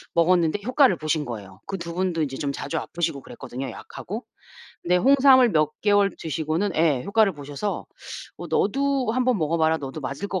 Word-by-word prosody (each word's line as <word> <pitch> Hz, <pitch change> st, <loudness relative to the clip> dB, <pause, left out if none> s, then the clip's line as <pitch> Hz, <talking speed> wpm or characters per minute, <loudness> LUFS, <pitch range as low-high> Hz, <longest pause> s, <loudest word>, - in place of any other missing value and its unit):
먹었는데 170 Hz, +2 st, +3 dB
효과를 255 Hz, -, +4 dB
보신 155 Hz, -1 st, -1 dB
거예요. 100 Hz, -6 st, -8 dB
그 195 Hz, -, -3 dB
2 170 Hz, -1 st, -6 dB
분도 175 Hz, -3 st, 0 dB
이제 135 Hz, -2 st, -4 dB
좀 140 Hz, -1 st, -2 dB
자주 165 Hz, +3 st, -4 dB
아프시고 165 Hz, -5 st, -3 dB
그랬거든요, 130 Hz, 0 st, -7 dB
약하고. -, -, -8 dB, 0.6 s
근데 180 Hz, +1 st, +2 dB
홍삼을 260 Hz, 0 st, +6 dB
몇 155 Hz, -1 st, +2 dB
개월 205 Hz, -1 st, +4 dB
드시고는 160 Hz, +5 st, -2 dB
예 155 Hz, -6 st, +2 dB
효과를 215 Hz, 0 st, +3 dB
보셔서 145 Hz, +7 st, -5 dB, 0.5 s
"어 -, -, -6 dB
너도 270 Hz, +2 st, +1 dB
1 255 Hz, 0 st, +1 dB
번 250 Hz, -5 st, +2 dB
먹어 160 Hz, +1 st, 0 dB
봐라. 160 Hz, 0 st, +2 dB
너도 140 Hz, +1 st, -7 dB
맞을 140 Hz, +8 st, -4 dB
것 185 Hz, -, -2 dB
170 Hz, 370 characters per minute, -24 LUFS, 150-205 Hz, 0.6 s, 홍삼을